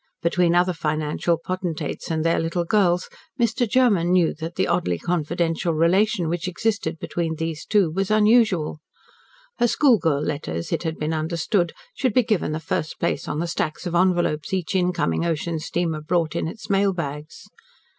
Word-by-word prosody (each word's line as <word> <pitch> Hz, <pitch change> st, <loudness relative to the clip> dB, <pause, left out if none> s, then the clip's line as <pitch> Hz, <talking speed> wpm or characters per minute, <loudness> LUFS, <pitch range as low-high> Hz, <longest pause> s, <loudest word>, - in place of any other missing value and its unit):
Between 170 Hz, 0 st, +2 dB
other 180 Hz, +1 st, +3 dB
financial 155 Hz, +1 st, -1 dB
potentates 170 Hz, -3 st, -4 dB
and 160 Hz, -1 st, -1 dB
their 165 Hz, -, +2 dB
little 165 Hz, +2 st, -1 dB
girls, 180 Hz, -2 st, +2 dB, 0.3 s
Mr. 235 Hz, +1 st, +1 dB
Germen 210 Hz, -9 st, +3 dB
knew 180 Hz, -3 st, +3 dB
that 165 Hz, +1 st, -7 dB
the -, -, +1 dB
oddly 90 Hz, -1 st, 0 dB
confidential 170 Hz, -, -1 dB
relation 180 Hz, +2 st, +2 dB
which 175 Hz, +2 st, -2 dB
existed 185 Hz, -3 st, -1 dB
between 165 Hz, 0 st, -3 dB
these 160 Hz, 0 st, -4 dB
two 200 Hz, -7 st, +3 dB
was 195 Hz, +3 st, -1 dB
unusual. 215 Hz, -8 st, +3 dB, 0.8 s
Her 240 Hz, -, +4 dB
schoolgirl 190 Hz, -, +3 dB
letters, 85 Hz, -, -3 dB
it -, -, 0 dB
had 160 Hz, -2 st, -3 dB
been 155 Hz, +1 st, -2 dB
understood, 170 Hz, +3 st, 0 dB, 0.2 s
should 255 Hz, -, -1 dB
be 250 Hz, -, +5 dB
given 215 Hz, -8 st, 0 dB
the 155 Hz, -, -2 dB
first 155 Hz, -1 st, -3 dB
place -, -, -1 dB
on 150 Hz, -, -2 dB
the 165 Hz, -, -1 dB
stacks 165 Hz, -1 st, -3 dB
of 175 Hz, -, -3 dB
envelopes 175 Hz, -2 st, +1 dB
each 185 Hz, 0 st, -3 dB
incoming 180 Hz, -, +1 dB
ocean 165 Hz, 0 st, -1 dB
steamer 165 Hz, -1 st, -2 dB
brought 165 Hz, 0 st, 0 dB
in -, -, -1 dB
its 215 Hz, +5 st, -8 dB
mail 200 Hz, -1 st, +2 dB
bags. 150 Hz, -3 st, -6 dB
170 Hz, 165 wpm, -23 LUFS, 160-190 Hz, 0.8 s, be